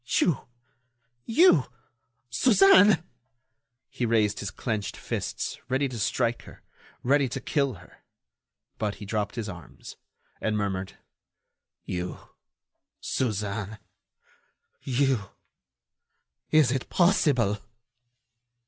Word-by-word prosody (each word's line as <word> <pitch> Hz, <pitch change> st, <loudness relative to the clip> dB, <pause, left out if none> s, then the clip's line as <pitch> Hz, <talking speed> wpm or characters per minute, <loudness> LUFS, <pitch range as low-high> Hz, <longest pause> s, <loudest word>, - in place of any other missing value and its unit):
"You! 160 Hz, -9 st, +1 dB, 0.8 s
You! 230 Hz, -, +5 dB, 0.7 s
Suzanne!" 195 Hz, -5 st, +6 dB, 0.8 s
He -, -, -5 dB
raised 110 Hz, -3 st, +2 dB
his 100 Hz, -, -3 dB
clenched 105 Hz, -2 st, -4 dB
fists, -, -, -4 dB
ready 135 Hz, +2 st, +1 dB
to 120 Hz, -3 st, -6 dB
strike 115 Hz, +2 st, 0 dB
her, -, -, -14 dB, 0.4 s
ready 135 Hz, +1 st, +3 dB
to 135 Hz, -, -4 dB
kill 140 Hz, -1 st, 0 dB
her. 90 Hz, -, -17 dB, 0.8 s
But 105 Hz, -2 st, -1 dB
he 105 Hz, -, -9 dB
dropped 105 Hz, +1 st, -2 dB
his 115 Hz, -3 st, -4 dB
arms, 85 Hz, -4 st, -10 dB, 0.4 s
and 110 Hz, -1 st, 0 dB
murmured: 95 Hz, -2 st, -3 dB, 0.9 s
"You, 90 Hz, 0 st, -4 dB, 0.8 s
Suzanne.... 105 Hz, -3 st, -2 dB, 1.0 s
You!... 130 Hz, -5 st, 0 dB, 1.2 s
Is 155 Hz, -6 st, +4 dB
it 130 Hz, -1 st, -2 dB
possible?" 135 Hz, -, +3 dB
115 Hz, 95 wpm, -27 LUFS, 105-140 Hz, 1.2 s, Suzanne